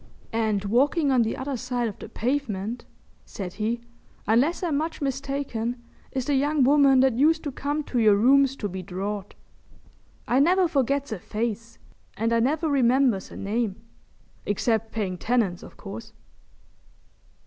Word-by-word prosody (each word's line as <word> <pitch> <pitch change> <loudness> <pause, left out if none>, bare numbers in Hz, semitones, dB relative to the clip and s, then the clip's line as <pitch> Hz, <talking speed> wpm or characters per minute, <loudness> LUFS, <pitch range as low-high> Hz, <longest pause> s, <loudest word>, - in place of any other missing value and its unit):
"And 215 -3 0
walking 280 - +2
on 255 -2 +4
the 225 -1 -1
other 275 +1 -3
side 245 -1 -2
of 210 - -7
the - - -9
pavement," 235 -3 -2 0.4
said 185 -3 -7
he, 230 +2 -1 0.5
"unless 265 +12 +2
I'm 330 -5 0
much 320 +3 -2
mistaken, 270 -4 -3 0.3
is 260 -2 -2
the 290 - 0
young 285 +1 +2
woman 275 -1 +5
that 260 -3 +2
used 320 +3 +3
to 290 - -3
come 290 +3 -2
to 250 - -2
your 215 -3 +5
rooms 270 +5 +4
to 210 - -3
be 190 -1 -6
drawed. 195 +2 -5 0.9
I 250 - +3
never 360 +5 +4
forgets 280 -3 0
a 215 - -3
face 230 +3 -4 0.4
and 230 +2 0
I 230 - +3
never 300 +7 +1
remembers 255 -6 +2
a - - -10
name, 210 0 -1 0.7
except 220 +2 0
paying 190 -5 -3
tenants, 220 -7 0
o' - - -9
course!" 220 +3 -10
245 Hz, 155 wpm, -25 LUFS, 220-280 Hz, 0.9 s, woman